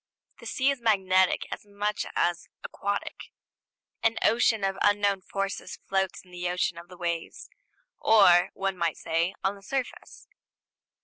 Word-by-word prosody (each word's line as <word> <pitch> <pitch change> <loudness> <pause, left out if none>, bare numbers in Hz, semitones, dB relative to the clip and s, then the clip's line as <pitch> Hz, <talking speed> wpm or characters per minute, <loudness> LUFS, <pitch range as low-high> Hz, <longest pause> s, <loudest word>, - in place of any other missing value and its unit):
The 235 - -9
sea 260 +4 +2
is 275 -3 -5
magnetic 190 -4 +3
as - - -5
much 205 +1 -3
as 175 0 0 0.2
aquatic: 200 0 -4 0.7
an 225 0 +2
ocean 225 -2 +3
of 195 0 -1
unknown 205 -1 +3
forces 195 +1 -4
floats 190 -1 -1
in 180 - -20
the 175 0 -3
ocean 180 -1 -1
of 170 - -13
the 180 - -13
waves, 170 -2 -4 0.5
or, 180 -5 +6
one 195 -1 -2
might 170 -2 -1
say, 165 +3 -1
on 195 - +1
the 200 - -14
surface. 265 +4 -5
195 Hz, 145 wpm, -27 LUFS, 180-210 Hz, 0.7 s, or